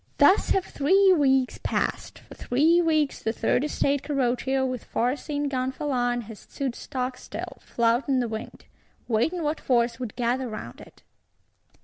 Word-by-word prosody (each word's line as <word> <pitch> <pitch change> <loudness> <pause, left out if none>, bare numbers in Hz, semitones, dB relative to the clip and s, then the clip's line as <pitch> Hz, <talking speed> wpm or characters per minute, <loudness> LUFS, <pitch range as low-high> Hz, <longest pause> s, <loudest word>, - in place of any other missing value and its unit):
Thus 385 - +5
have 385 - +2
three 380 +7 +4
weeks 265 -5 +2
passed. - - -2
For - - -11
three 315 +8 +3
weeks, 310 -4 +1
the 225 - 0
Third 245 - 0
Estate 285 -2 0
Carroccio, 265 -1 0
with 255 -3 -3
far 245 +3 0
seen 290 -1 -3
Gonfalon, 255 -2 -1
has 225 -2 -10
stood 270 -3 -4
stockstill, 255 +1 -5
flouting 240 +3 +1
the 245 - 0
wind; 220 -1 -7 0.4
waiting 320 +10 0
what 300 +1 -1
force 235 -2 +1
would 245 -5 -5
gather 245 +1 -1
round 165 - -8
it. - - -16
260 Hz, 145 wpm, -26 LUFS, 240-290 Hz, 0.4 s, Thus